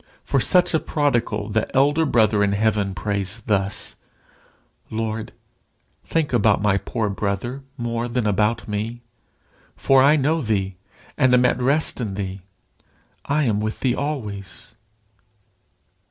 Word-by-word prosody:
For 135 - +1
such 180 +6 +3
a 160 - +3
prodigal, 120 -10 -1
the 110 +1 0
elder 145 +4 +3
brother 110 -4 +3
in 100 0 +1
heaven 105 -2 0
prays 100 +1 -3
thus 100 -3 -1 0.9
"Lord, 110 0 -3 0.7
think 160 -5 -1
about 115 -4 +3
my 100 -1 +2
poor 110 +1 -2
brother 100 +6 -3 0.2
more 120 0 -2
than 120 -1 -1
about 105 +3 +1
me, 110 +3 -4 0.7
for 135 -1 +4
I 140 +3 +6
know 155 +3 +1
thee, 100 -5 -1 0.4
and 130 -1 +5
am 125 0 +4
at 125 0 +1
rest 140 +1 +1
in 105 -5 -3
thee. 95 -1 -5 0.8
I 150 +2 +1
am 105 -4 +1
with 110 +1 -3
thee 125 -2 +2
always." 105 -9 -5
110 Hz, 135 wpm, -22 LUFS, 105-130 Hz, 0.9 s, I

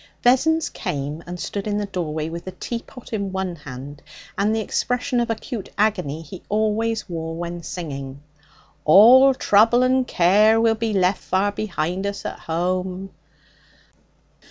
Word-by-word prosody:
Vessons 315 +6 +3
came 145 +3 -4
and 175 0 -6
stood 200 +3 -4
in 205 -1 0
the 210 - -1
doorway 160 -5 -3
with 170 +1 -7
the 185 - -6
teapot 235 0 -7
in 200 -3 -2
one 190 -2 -3
hand 140 0 -9 0.3
and 205 +2 +1
the - - 0
expression 245 +4 -1
of 235 0 0
acute 225 -1 -4
agony 180 -8 0
he 170 +4 -10
always 220 +1 0
wore 165 -2 -5
when 170 +1 -5
singing. 140 -5 -7 0.6
'All 250 - +7
trouble 230 +3 +4
and 255 0 +2
care 210 +5 +4
Will 225 0 +4
be 225 0 -2
left 190 -1 +1
far 195 +2 0
behind 190 -2 -2
us 200 0 -5
at - - -5
home!' 185 +3 -2
195 Hz, 150 wpm, -22 LUFS, 170-225 Hz, 0.6 s, All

